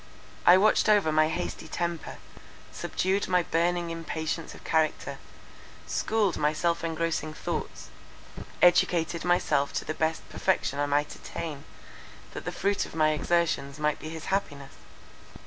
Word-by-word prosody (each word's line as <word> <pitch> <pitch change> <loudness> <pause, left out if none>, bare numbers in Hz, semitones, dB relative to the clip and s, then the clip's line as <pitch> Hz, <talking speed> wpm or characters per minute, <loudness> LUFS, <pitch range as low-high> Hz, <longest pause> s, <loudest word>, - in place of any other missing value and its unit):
I 175 +1 +9
watched 215 +2 +4
over 205 -7 +4
my 155 0 +4
hasty 160 - -4
temper, 170 0 -3 0.5
subdued 190 +2 -1
my 180 -1 +3
burning 170 +1 0
impatience 165 0 -4
of - - -15
character, 160 -1 0 0.7
schooled 215 -5 0
my 150 +1 +2
self 170 +2 0
engrossing 165 -1 -2
thoughts, - - -5 0.7
educating 170 -1 +4
myself 150 -5 +1
to - - -2
the 155 - -2
best 160 +1 -1
perfection 180 -6 0
I 145 - +1
might 145 +1 0
attain, 150 -4 -7 0.7
that - - -7
the - - -2
fruit 200 0 0
of - - -12
my 155 -1 +3
exertions 155 -2 0
might 150 -1 0
be 155 - -7
his 160 0 -7
happiness. 145 -8 -3
165 Hz, 140 wpm, -28 LUFS, 155-175 Hz, 0.7 s, I